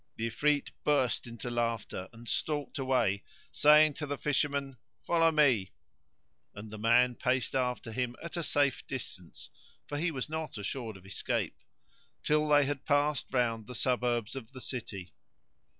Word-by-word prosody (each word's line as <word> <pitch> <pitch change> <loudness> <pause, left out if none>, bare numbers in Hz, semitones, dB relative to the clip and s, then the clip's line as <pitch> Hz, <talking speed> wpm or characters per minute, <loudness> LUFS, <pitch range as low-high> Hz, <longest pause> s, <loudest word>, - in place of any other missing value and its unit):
The 115 - -2
Ifrit 145 +4 +1
burst 130 -6 +2
into 115 +1 -6
laughter 115 -5 -2
and 115 +1 -13
stalked 145 +5 -2
away, 120 -7 +1 0.3
saying 150 0 +6
to 150 +1 -5
the 145 0 -3
Fisherman, 140 -2 0 0.3
"Follow 165 -1 +4
me;" 130 - +3 0.8
and 105 +1 -8
the 110 - -7
man 125 +3 +4
paced 125 0 0
after 125 -3 -1
him 120 +1 -2
at 170 - -7
a 170 - -1
safe 145 -4 +1
distance 100 -9 -7 0.3
(for 145 - -4
he 170 +3 +1
was 135 -5 -3
not 155 -4 -4
assured 110 +1 -4
of 95 - -17
escape) 95 - -2 0.7
till 150 0 +2
they 145 -1 +5
had 145 0 -3
passed 145 -1 +1
round 115 -4 0
the 125 - -8
suburbs 120 -2 0
of 130 -1 -8
the 130 - -9
city. 100 -9 -6
130 Hz, 155 wpm, -31 LUFS, 115-145 Hz, 0.8 s, saying